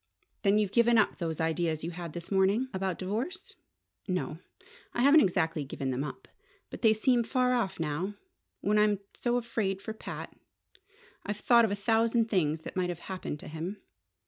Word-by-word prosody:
"Then 200 Hz, +1 st, +4 dB
you've 210 Hz, -3 st, +1 dB
given 235 Hz, 0 st, +4 dB
up 215 Hz, -, +3 dB
those 165 Hz, -3 st, -3 dB
ideas 160 Hz, -1 st, 0 dB
you 170 Hz, -, -3 dB
had 170 Hz, -2 st, -7 dB
this 170 Hz, +1 st, -7 dB
morning?" 200 Hz, +6 st, +2 dB
"About 190 Hz, -2 st, -1 dB
divorce? 235 Hz, -, -4 dB, 0.5 s
No. 180 Hz, -4 st, -2 dB, 0.6 s
I 240 Hz, -, +2 dB
haven't 290 Hz, +3 st, +8 dB
exactly 165 Hz, -, +1 dB
given 135 Hz, -1 st, -3 dB
them 130 Hz, +2 st, -1 dB
up. 150 Hz, -, -7 dB, 0.4 s
But -, -, -8 dB
they 225 Hz, -, +6 dB
seem 235 Hz, +3 st, +3 dB
far 250 Hz, +2 st, +1 dB
off 195 Hz, -7 st, -1 dB
now 165 Hz, +6 st, -2 dB, 0.5 s
when 210 Hz, +1 st, +2 dB
I'm 210 Hz, -1 st, +4 dB, 0.2 s
so 240 Hz, 0 st, 0 dB
afraid 225 Hz, -5 st, -1 dB
for 215 Hz, +2 st, -6 dB
Pat. 220 Hz, -, -7 dB, 0.9 s
I've 205 Hz, 0 st, -3 dB
thought 235 Hz, +1 st, +5 dB
of 215 Hz, -, -2 dB
a -, -, +1 dB
thousand 225 Hz, +2 st, +2 dB
things 160 Hz, -5 st, +1 dB
that -, -, -8 dB
might 180 Hz, -1 st, 0 dB
have 175 Hz, -1 st, -5 dB
happened 180 Hz, -5 st, -4 dB
to -, -, -9 dB
him. 170 Hz, +6 st, -6 dB
195 Hz, 180 wpm, -30 LUFS, 170-230 Hz, 0.9 s, haven't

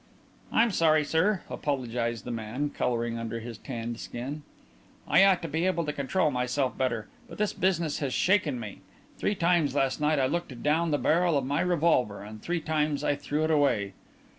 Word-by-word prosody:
"I'm 230 Hz, 0 st, +3 dB
sorry, 155 Hz, -4 st, +3 dB
sir," 180 Hz, +6 st, +1 dB
apologized 120 Hz, -5 st, -2 dB
the 125 Hz, -, -4 dB
man, 120 Hz, +6 st, -3 dB
colouring 120 Hz, -1 st, -1 dB
under 115 Hz, 0 st, -4 dB
his 115 Hz, -1 st, -8 dB
tanned 120 Hz, -3 st, -5 dB
skin. 135 Hz, +6 st, -6 dB, 0.7 s
"I -, -, +6 dB
ought 195 Hz, -3 st, +4 dB
to -, -, -2 dB
be 160 Hz, +4 st, 0 dB
able 170 Hz, -3 st, 0 dB
to 150 Hz, -, -2 dB
control 150 Hz, +4 st, 0 dB
myself 125 Hz, +1 st, -1 dB
better. 115 Hz, -5 st, -1 dB, 0.2 s
But -, -, -10 dB
this 210 Hz, -1 st, 0 dB
business 170 Hz, -5 st, 0 dB
has 140 Hz, -3 st, -2 dB
shaken 170 Hz, -6 st, +2 dB
me. 105 Hz, -4 st, -8 dB, 0.4 s
Three 205 Hz, -, 0 dB
times 170 Hz, -6 st, +2 dB
last 135 Hz, +1 st, +1 dB
night 150 Hz, 0 st, +2 dB
I 135 Hz, -, +3 dB
looked 140 Hz, -4 st, -3 dB
down 160 Hz, +3 st, +2 dB
the 145 Hz, -, +2 dB
barrel 165 Hz, +4 st, +2 dB
of 135 Hz, -, -1 dB
my 140 Hz, +2 st, 0 dB
revolver, 160 Hz, -, +1 dB
and 105 Hz, +1 st, -10 dB
three 175 Hz, -1 st, -2 dB
times 150 Hz, -2 st, 0 dB
I -, -, +2 dB
threw 145 Hz, +2 st, -2 dB
it 160 Hz, -, +1 dB
away.... 115 Hz, -10 st, +2 dB
145 Hz, 190 wpm, -28 LUFS, 120-165 Hz, 0.7 s, I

